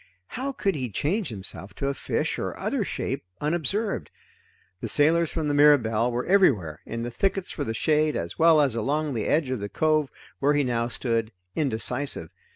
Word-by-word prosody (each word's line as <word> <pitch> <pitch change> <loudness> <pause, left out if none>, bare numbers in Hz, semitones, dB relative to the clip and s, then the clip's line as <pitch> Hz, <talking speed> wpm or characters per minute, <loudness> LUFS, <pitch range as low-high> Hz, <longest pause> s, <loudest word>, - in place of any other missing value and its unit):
How 270 +3 -3
could 200 -7 0
he 130 -6 -3
change 175 - -1
himself 95 -2 -6
to 140 - -2
a 140 - 0
fish - - -2
or - - -3
other - - -1
shape, - - -3 0.2
unobserved? 175 +8 -1 0.7
The - - -4
sailors 165 +2 +4
from 160 -2 -2
the 145 - +1
Mirabelle 125 -6 +4
were 120 +1 -2
everywhere 110 - +3
in 115 0 -4
the 120 - -4
thickets 195 +6 -1
for 145 - -3
the 115 -4 -3
shade, 155 +3 +2
as 85 0 -4
well 160 -1 +6
as 140 -5 +2
along 145 +6 -1
the 110 -3 -2
edge 150 -4 +1
of 130 - -1
the 100 0 -5
cove 155 0 +1 0.3
where 145 +2 +3
he 145 - +3
now 120 -2 0
stood, 115 -2 -1 0.2
indecisive. 135 - -1
145 Hz, 185 wpm, -26 LUFS, 115-155 Hz, 0.7 s, well